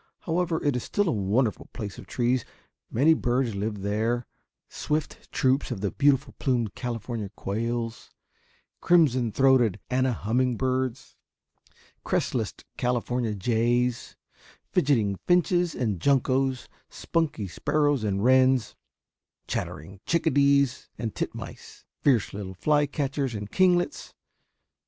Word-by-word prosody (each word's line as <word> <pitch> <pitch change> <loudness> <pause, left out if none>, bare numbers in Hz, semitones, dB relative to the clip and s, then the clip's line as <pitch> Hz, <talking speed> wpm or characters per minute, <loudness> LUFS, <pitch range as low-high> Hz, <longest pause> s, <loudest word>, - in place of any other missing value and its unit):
However, 170 -1 0
it 145 -3 +1
is 125 - -1
still 205 -1 0
a - - +2
wonderful 105 +3 0
place 105 -4 -6
of - - -11
trees. 125 0 0 0.5
Many 145 +7 +4
birds 125 -4 0
live 100 0 -3
there; 110 +4 0 0.4
swift 150 0 -4
troops 130 +1 +1
of 115 -7 -4
the 100 - -1
beautiful 140 -1 +2
plumed 120 -6 0
California 115 -3 -4
quails; 115 +2 -3 0.7
crimson 130 -9 +3
throated 130 -5 +3
Anna 130 0 +2
humming 120 +3 0
birds, 130 0 -2 0.9
crestless - - -1 0.3
California 120 -2 -1
jays, 120 +4 0 0.6
fidgeting 110 -9 +2
finches 175 -1 +2
and 110 -8 -1
juncos, 135 -1 +1 0.2
spunky 155 -11 -2
sparrows 145 - 0
and 100 -1 -1
wrens, 130 -1 +4 0.7
chattering 95 +6 -5
chickadees 140 -4 +2
and 115 -2 -4
titmice, - - -7 0.2
fierce 125 -8 +2
little 95 -2 -6
fly 145 - +2
catchers 140 -3 -2
and 105 0 -6
kinglets. 180 +5 +1
125 Hz, 115 wpm, -26 LUFS, 110-140 Hz, 0.9 s, Many